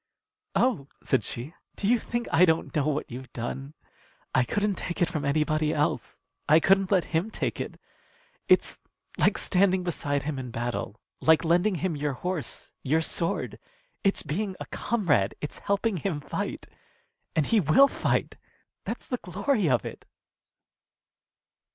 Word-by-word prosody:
"Oh!" 230 - +2 0.2
said 130 - +2
she, 125 +7 -6 0.2
"do 200 - -2
you 240 +2 +4
think 240 +2 -3
I 175 - +5
don't 160 -1 +2
know 150 -1 +2
what 150 -3 -1
you've 130 +2 -8
done? 135 +5 -5 0.6
I 130 - +4
couldn't 205 - 0
take 175 - -4
it 175 - +3
from 155 -4 -3
anybody 155 +1 +1
else. 150 0 -1 0.3
I 155 +2 +8
couldn't 195 +2 +4
let 190 -4 +4
him 165 +7 +1
take - - -2
it. - - -6 0.7
It's - - +3 0.4
like - - +4
standing 185 -1 +2
beside 145 -5 -1
him 140 -1 -3
in 125 -1 -5
battle; 120 -1 -3 0.2
like 160 +1 +4
lending 180 +5 +3
him 180 -1 -1
your 145 -1 -1
horse, 160 -2 -4
your 155 +5 +2
sword. 165 +1 -2 0.4
It's 195 - +2
being 185 +6 -2
a - - -5
comrade. 170 - +1
It's 150 - -6
helping 200 0 0
him 165 -2 -2
fight. - - -4 0.7
And 155 -3 +3
he 225 - +3
will 190 - +6
fight. - - -1 0.5
That's - - -4
the 250 - -2
glory 200 - 0
of 125 -2 +2
it!" - - -8
160 Hz, 155 wpm, -27 LUFS, 145-195 Hz, 0.7 s, I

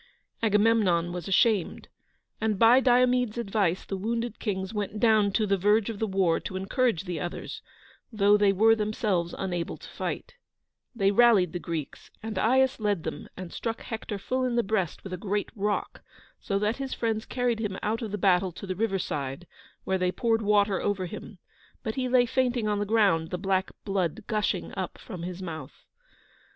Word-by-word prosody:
Agamemnon 205 -6 +3
was 175 -2 -5
ashamed, 200 -1 +2 0.5
and, 220 -2 +1
by 230 +5 +7
Diomede's 250 -2 +3
advice, 195 -5 0
the 195 - -4
wounded 230 +3 -3
kings 190 -2 -3
went 210 0 -3
down 215 -3 +4
to 215 - +2
the 195 -1 +1
verge 210 +3 +3
of 210 - -8
the 220 - 0
war 190 -4 +2
to 190 - -7
encourage 195 - 0
the 175 -4 -4
others, 175 +3 -5 0.5
though 205 -2 +4
they 205 -1 +4
were 220 +3 +5
themselves 210 -5 -1
unable 175 -3 -3
to - - -12
fight. - - -5 0.6
They 195 -3 +3
rallied 205 -6 +5
the 175 - -3
Greeks, 165 -4 -6
and 220 -1 -3
Aias 260 +3 +3
led 205 -6 0
them - - -6
and 185 -2 -7
struck 225 0 -3
Hector 220 -2 -5
full 255 +6 -2
in 250 -2 0
the 235 - +2
breast 195 -5 -1
with 190 - -7
a - - -3
great 205 +2 -2
rock, 205 0 -2 0.4
so 195 - -1
that 210 +3 0
his 270 -1 -4
friends 225 -2 -1
carried 245 -3 0
him 205 -4 -3
out 220 +3 -1
of 225 - -3
the 210 - -3
battle 185 -1 +3
to 190 - -8
the 185 -1 -3
river 205 0 0
side, 140 -2 -4 0.4
where 190 0 0
they 180 0 +1
poured 225 +2 +1
water 205 -2 +2
over 200 -2 -1
him, 175 - -8 0.5
but 220 -3 -2
he 255 0 -2
lay 245 -1 +5
fainting 245 -2 0
on 210 -1 0
the 205 - -2
ground, 195 -8 +3
the 180 - -3
black 190 0 0 0.2
blood 195 0 -1
gushing 215 -2 -1
up - - -4
from 180 - -8
his 180 +2 -6
mouth. 160 -3 -8
205 Hz, 190 wpm, -27 LUFS, 185-225 Hz, 0.6 s, by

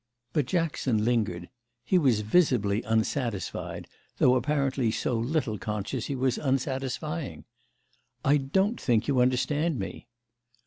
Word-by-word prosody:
But 145 -5 +1
Jackson 140 -10 0
lingered; 105 -8 0 0.4
he 185 +7 +3
was 125 -9 +3
visibly 110 - +2
unsatisfied, 110 -1 -2 0.3
though 125 - +5
apparently 135 -1 +1
so 110 +3 -1
little 115 -2 -1
conscious 105 +3 -3
he 140 - -2
was 130 -1 0
unsatisfying. 135 - -2 0.8
"I 145 +2 +5
don't 190 - 0
think 115 -3 +2
you 135 -3 +2
understand 130 +5 +1
me." 100 +3 -6
130 Hz, 120 wpm, -28 LUFS, 110-145 Hz, 0.8 s, though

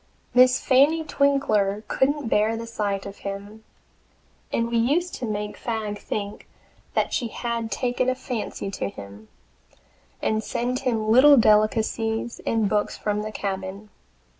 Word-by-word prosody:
Miss 255 +1 +6
Fanny 290 +5 +4
Twinkler 220 -9 +1
couldn't 285 0 +1
bear 220 +1 +2
the 230 - -5
sight 205 -4 -2
of 200 0 -8
him, 200 +2 -7 0.9
and 230 - 0
we 235 - +1
used 305 +10 +1
to 245 - -4
make 210 -1 -3
Fagg 215 -3 -3
think 205 0 -5 0.5
that - - +1
she 240 - 0
had 230 -1 -3
taken 250 +4 0
a 255 - 0
fancy 235 -6 -4
to 100 - -3
him, 100 +2 -11 0.9
and 215 0 0
send 250 +2 -2
him 225 -5 0
little 275 +4 +8
delicacies 220 +1 +2
and 225 -2 +2
books 210 0 0
from 210 0 -1
the 215 0 -5
cabin. 195 0 -5
220 Hz, 140 wpm, -24 LUFS, 205-250 Hz, 0.9 s, little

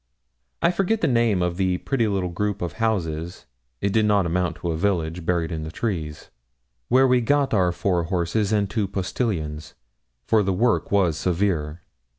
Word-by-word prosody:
I 170 - +5
forget 195 +4 0
the - - +2
name 115 -7 +2
of 90 0 -1
the 95 -2 +1
pretty 120 +2 0
little 95 -3 -1
group 105 +2 -2
of 85 -4 -3
houses 85 -7 -2 0.4
it 100 -1 0
did 110 -1 +3
not 100 -3 +3
amount 85 0 0
to 85 - -3
a - - -2
village 85 -2 -1
buried 85 -2 0
in 80 -1 -4
trees, 80 -5 -4 0.6
where 130 +2 +5
we 125 -1 +3
got 140 +3 +1
our 90 -4 +3
four 85 -1 0
horses 95 +4 0
and 105 -2 +2
two 105 -1 -1
postilions, 85 - -3 0.5
for 110 -1 +3
the 95 -1 0
work 115 +5 +1
was 90 -6 +2
severe. 85 -4 -1
95 Hz, 170 wpm, -23 LUFS, 85-110 Hz, 0.6 s, I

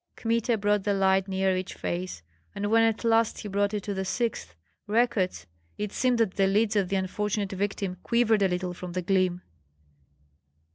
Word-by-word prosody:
Kmita 230 0 0
brought 205 -1 +1
the 205 0 +1
light 190 0 +2
near 190 -1 +1
each 185 0 -4
face; 175 - -4 0.3
and 205 +1 -2
when 225 0 +5
at 225 0 +1
last 225 -1 +2
he 215 - -6
brought 200 0 0
it 205 - -3
to 205 - -3
the 190 0 -2
sixth, 190 - -2 0.3
Rekuts, 210 - +1 0.3
it 210 -1 -4
seemed 250 -1 +2
that 220 -5 0
the 195 -1 +4
lids 210 +2 +2
of 195 -3 +1
the 195 - 0
unfortunate 200 +1 -1
victim 195 -1 -2
quivered 230 -3 +2
a 195 - +4
little 180 0 -2
from 180 0 -8
the 180 0 -2
gleam. 185 -1 +1
200 Hz, 185 wpm, -27 LUFS, 185-220 Hz, 0.3 s, when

